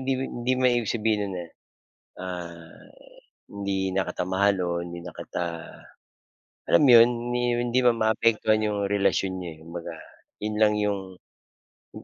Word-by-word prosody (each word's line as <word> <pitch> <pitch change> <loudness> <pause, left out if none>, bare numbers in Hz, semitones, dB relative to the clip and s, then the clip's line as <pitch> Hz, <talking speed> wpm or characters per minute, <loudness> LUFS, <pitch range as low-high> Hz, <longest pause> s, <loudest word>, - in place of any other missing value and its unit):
hindi 135 +1 0
man 130 +1 -3
hindi 125 +2 +1
naman 130 0 +3
ibig 115 - -2
sabihin 110 -1 +1
no'n 95 - -5
na, 90 - -5 0.8
ah, 85 -2 -8 0.6
hindi 100 -1 -3
na 95 +1 0
kita - - -3
mahal 100 +2 +3
o 90 - -1 0.2
hindi 85 0 -8
na 90 - -8
kita 90 - -4 1.2
alam - - +5
'yon, 115 -1 +9
hindi 120 0 -2 0.2
hindi 120 +1 +1
man 120 - +4
maapektuhan 110 -1 +2
'yong 105 -1 -1
relasyon 100 -1 +1
niyo, 90 -2 -6
eh, - - -19
kumbaga, 85 0 -7 0.5
'yon 105 0 -2
lang 105 -1 +5
'yong 105 -1 0 0.9
'yong - - -10
100 Hz, 160 wpm, -26 LUFS, 90-115 Hz, 1.2 s, yon